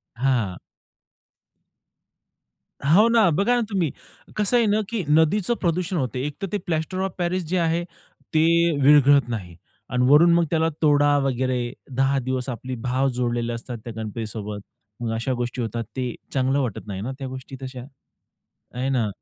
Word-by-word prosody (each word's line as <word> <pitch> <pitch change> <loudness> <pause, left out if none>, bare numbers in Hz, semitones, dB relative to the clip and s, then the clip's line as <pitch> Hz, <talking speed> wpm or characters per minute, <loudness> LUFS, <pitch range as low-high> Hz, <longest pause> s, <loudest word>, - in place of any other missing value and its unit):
हां. 120 -7 0 2.4
हो 215 +5 +6
ना. 230 -6 +4
बघा 200 +10 +2
ना 245 - +2
तुम्ही, 180 -8 0 0.4
कसं 210 +3 +2
आहे 235 -2 +4
ना, 210 +1 +2
की 230 -4 -2
नदीचं 160 +9 +3
प्रदूषण 180 +1 0
होतं 130 -4 -2
आहे, 130 - -1
एकतर 150 +7 -5
ते 205 - +1
प्लास्टर 165 +2 -2
ऑफ 190 - -7
पॅरिस 180 +1 -1
जे 185 +3 0
आहे, 170 0 +1 0.5
ते 155 - +4 0.4
विरघळत 145 -1 +6
नाही. 95 -8 -5 0.3
आणि 125 -1 +1
वरून 170 +4 +7
मग 170 - +4
त्याला 160 -1 +2
तोडा 145 -1 +4
वगैरे 130 -1 0 0.3
10 135 +1 +2
दिवस 130 0 -2
आपली 125 +1 -5
भाव 130 +2 +2
जोडलेले 120 -1 -1
असतात 120 +1 -6
त्या 120 - -6
गणपतीसोबत, 105 -1 -5 0.4
मग 115 -2 -2
अशा 115 +4 -1
गोष्टी 120 0 -3
होतात, 115 +1 -3
ते 125 -2 -2 0.2
चांगलं 135 +1 +1
वाटत 115 -5 -3
नाही 95 -2 -5
ना 130 +5 -3
त्या 135 -2 -5
गोष्टी 130 +1 -8
तशा. 130 -1 -7 0.9
हे 130 +2 -1
ना? 120 -5 +1
135 Hz, 160 wpm, -23 LUFS, 120-170 Hz, 2.4 s, वरून